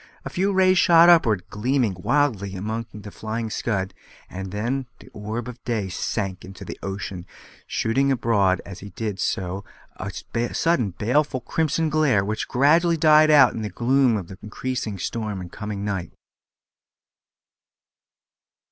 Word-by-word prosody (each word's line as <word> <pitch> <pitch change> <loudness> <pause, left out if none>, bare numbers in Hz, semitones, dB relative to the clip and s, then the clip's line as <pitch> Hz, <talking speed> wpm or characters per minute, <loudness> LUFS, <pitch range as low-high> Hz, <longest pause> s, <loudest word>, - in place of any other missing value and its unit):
A - - -5
few 195 +3 0
rays 185 -1 +4
shot 170 0 +7
upward, 115 - +4
gleaming 120 0 0
wildly 105 -5 0
among 110 +4 -4
the 105 -1 -10
flying 110 0 -4
scud, 95 -5 -2 0.4
and 95 0 -6
then 120 +6 -2
the - - -16
orb 110 +3 -5
of 125 -1 -10
day 110 -5 -2
sank 95 +1 -3
into 95 0 -10
the - - -8
ocean, 95 -2 -5 0.4
shooting 135 +5 +1
abroad 105 -7 +2
as 100 -1 -9
he 100 - -9
did 100 0 -4
so 95 +1 -2 0.3
a - - -5 0.4
sudden 165 -11 +2
baleful 130 +4 +1
crimson 160 +4 0
glare, 140 -10 +2
which 110 +1 -3
gradually 165 +6 +3
died 155 0 +6
out 145 -4 +6
in 110 - -5
the 105 - -3
gloom 125 +3 +2
of 95 -1 -7
increasing 110 -1 -4
storm 105 +1 -3
and 90 -1 -8
coming 105 -1 -5
night. 95 -5 -3
110 Hz, 145 wpm, -23 LUFS, 100-140 Hz, 0.4 s, shot